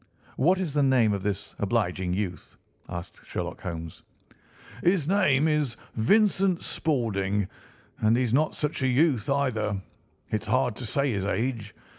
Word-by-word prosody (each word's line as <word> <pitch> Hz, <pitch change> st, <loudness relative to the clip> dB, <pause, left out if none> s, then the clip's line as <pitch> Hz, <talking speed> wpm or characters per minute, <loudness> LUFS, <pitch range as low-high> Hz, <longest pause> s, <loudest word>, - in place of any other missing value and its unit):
"What 180 Hz, +8 st, +3 dB
is 175 Hz, -7 st, -2 dB
the 145 Hz, -, +2 dB
name 130 Hz, -6 st, +4 dB
of 100 Hz, -, -2 dB
this 100 Hz, 0 st, -3 dB
obliging 95 Hz, -4 st, 0 dB
youth?" 95 Hz, -3 st, -4 dB, 0.3 s
asked 85 Hz, 0 st, -7 dB
Sherlock -, -, -5 dB
Holmes. 85 Hz, -2 st, -6 dB, 0.8 s
"His 175 Hz, -4 st, +2 dB
name 160 Hz, -7 st, +3 dB
is 150 Hz, -6 st, 0 dB, 0.2 s
Vincent 195 Hz, -, +3 dB
Spaulding, 105 Hz, -, 0 dB, 0.5 s
and 110 Hz, +2 st, +3 dB
he's 125 Hz, -2 st, 0 dB
not 150 Hz, +4 st, +2 dB
such 150 Hz, -2 st, -2 dB
a 130 Hz, -, +2 dB
youth, 130 Hz, -2 st, +2 dB
either. 110 Hz, -8 st, 0 dB, 0.5 s
It's 110 Hz, 0 st, -1 dB
hard 125 Hz, 0 st, +1 dB
to 120 Hz, -, -4 dB
say 140 Hz, +4 st, +1 dB
his 100 Hz, -3 st, -1 dB
age. 110 Hz, 0 st, -2 dB
120 Hz, 145 wpm, -27 LUFS, 105-145 Hz, 0.8 s, name